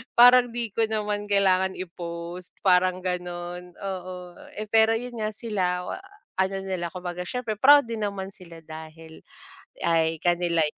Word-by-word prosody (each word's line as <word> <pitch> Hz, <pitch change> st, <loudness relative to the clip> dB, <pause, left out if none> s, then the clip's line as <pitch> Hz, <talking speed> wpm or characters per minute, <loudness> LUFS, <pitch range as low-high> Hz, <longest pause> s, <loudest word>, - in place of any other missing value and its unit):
parang 245 Hz, +1 st, +8 dB
di 235 Hz, -3 st, -2 dB
ko 225 Hz, +1 st, +1 dB
naman 210 Hz, -1 st, -2 dB
kailangan 190 Hz, -2 st, +3 dB
i-post. 170 Hz, 0 st, -7 dB
Parang 185 Hz, -1 st, +3 dB
ganun, 180 Hz, 0 st, -4 dB
oo. 180 Hz, -2 st, -7 dB, 0.2 s
Eh 215 Hz, 0 st, -6 dB
pero 225 Hz, 0 st, +5 dB
yun 240 Hz, 0 st, -5 dB
nga, 215 Hz, -1 st, -2 dB
sila, 185 Hz, -6 st, -1 dB, 0.6 s
ano 190 Hz, +1 st, 0 dB
nila, 180 Hz, -3 st, -3 dB
kumbaga 180 Hz, 0 st, -5 dB
siyempre 250 Hz, -3 st, -2 dB
proud 285 Hz, 0 st, +8 dB
din 230 Hz, -2 st, -4 dB
naman 195 Hz, -1 st, -3 dB
sila 170 Hz, -3 st, -13 dB
dahil 160 Hz, 0 st, -11 dB, 0.6 s
ay 165 Hz, -1 st, +2 dB
kanila 175 Hz, -2 st, +2 dB
185 Hz, 140 wpm, -26 LUFS, 175-215 Hz, 0.6 s, parang